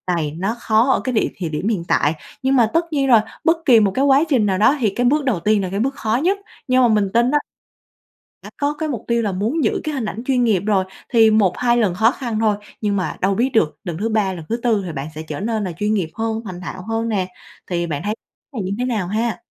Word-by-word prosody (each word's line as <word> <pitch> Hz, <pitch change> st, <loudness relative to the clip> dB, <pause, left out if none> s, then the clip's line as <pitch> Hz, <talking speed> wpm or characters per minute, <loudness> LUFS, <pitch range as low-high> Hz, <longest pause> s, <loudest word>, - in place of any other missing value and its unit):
này 155 Hz, -3 st, -2 dB
nó 195 Hz, +6 st, -1 dB
khó 225 Hz, +4 st, +2 dB
ở -, -, +2 dB
cái 255 Hz, -, -2 dB
điểm 220 Hz, -, +1 dB
thì 170 Hz, -4 st, -3 dB
điểm 155 Hz, +6 st, -3 dB
hiện 200 Hz, -7 st, 0 dB
tại, 145 Hz, -, +2 dB, 0.3 s
nhưng 270 Hz, +1 st, +2 dB
mà 230 Hz, -3 st, +4 dB
tất 330 Hz, +1 st, +2 dB
nhiên 275 Hz, -2 st, +1 dB
rồi, 235 Hz, -4 st, +7 dB, 0.2 s
bất 330 Hz, 0 st, +3 dB
kỳ 240 Hz, -5 st, +7 dB
một 205 Hz, -2 st, +2 dB
cái 265 Hz, +8 st, +1 dB
quá 280 Hz, +2 st, +5 dB
trình 245 Hz, -8 st, +3 dB
nào 190 Hz, -2 st, +1 dB
đó 220 Hz, +8 st, +4 dB
thì 225 Hz, -5 st, +2 dB
cái 245 Hz, +5 st, -1 dB
bước 290 Hz, +3 st, +2 dB
đầu 235 Hz, -10 st, +1 dB
tiên 210 Hz, +3 st, +2 dB
là 185 Hz, -, -3 dB
cái 195 Hz, -, -3 dB
bước 270 Hz, +4 st, 0 dB
khó 220 Hz, 0 st, -1 dB
nhất. 390 Hz, +3 st, +2 dB, 0.3 s
Nhưng 255 Hz, 0 st, +4 dB
mà 245 Hz, -, +5 dB
mình 210 Hz, -3 st, +1 dB
tin 240 Hz, +3 st, +3 dB
á 295 Hz, -, +4 dB, 1.1 s
đã -, -, -9 dB
có 290 Hz, +1 st, +1 dB
cái 310 Hz, +1 st, -4 dB
mục 240 Hz, -7 st, -4 dB
tiêu 235 Hz, 0 st, +1 dB
là 205 Hz, -3 st, -1 dB
muốn 225 Hz, -, -1 dB
giữ 220 Hz, -, 0 dB
cái 305 Hz, -2 st, -3 dB
hình 245 Hz, -5 st, -2 dB
ảnh 220 Hz, +3 st, -5 dB
chuyên 255 Hz, -2 st, +2 dB
nghiệp 205 Hz, -6 st, +2 dB
rồi, 195 Hz, -3 st, +2 dB, 0.3 s
thì 225 Hz, -2 st, +6 dB
1-2 220 Hz, +4 st, +2 dB
lần 205 Hz, -7 st, +1 dB
khó 220 Hz, +5 st, +4 dB
khăn 235 Hz, -6 st, -4 dB
thôi, 215 Hz, -2 st, +2 dB, 0.3 s
nhưng 205 Hz, -1 st, 0 dB
mà 185 Hz, -, -2 dB
đâu 195 Hz, +1 st, +2 dB
biết 250 Hz, +5 st, +1 dB
được 175 Hz, -, +1 dB
lần 170 Hz, -3 st, -4 dB
thứ 225 Hz, +4 st, -1 dB
3, 210 Hz, -4 st, +1 dB
lần 165 Hz, -3 st, -8 dB
thứ 230 Hz, -, 0 dB
4 220 Hz, -5 st, +2 dB
thì 170 Hz, -, -4 dB
bạn 140 Hz, +1 st, -5 dB
sẽ 155 Hz, -, -5 dB
trở 155 Hz, -2 st, -6 dB
nên 220 Hz, +1 st, -1 dB
là 185 Hz, -, -3 dB
chuyên 210 Hz, +2 st, 0 dB
nghiệp 180 Hz, -6 st, -1 dB
hơn, 225 Hz, 0 st, -2 dB
thành 180 Hz, -2 st, -7 dB
thạo 185 Hz, +1 st, -6 dB
hơn 225 Hz, +1 st, -1 dB
nè, 190 Hz, -4 st, 0 dB, 0.4 s
thì 170 Hz, -1 st, -1 dB
bạn 145 Hz, -3 st, -4 dB
thấy 210 Hz, +1 st, -1 dB, 0.4 s
này 225 Hz, -, -3 dB
như 185 Hz, -, -3 dB
thế 250 Hz, -, 0 dB
nào 215 Hz, -8 st, -1 dB
ha? 220 Hz, -1 st, -1 dB
220 Hz, 275 wpm, -20 LUFS, 190-245 Hz, 1.1 s, rồi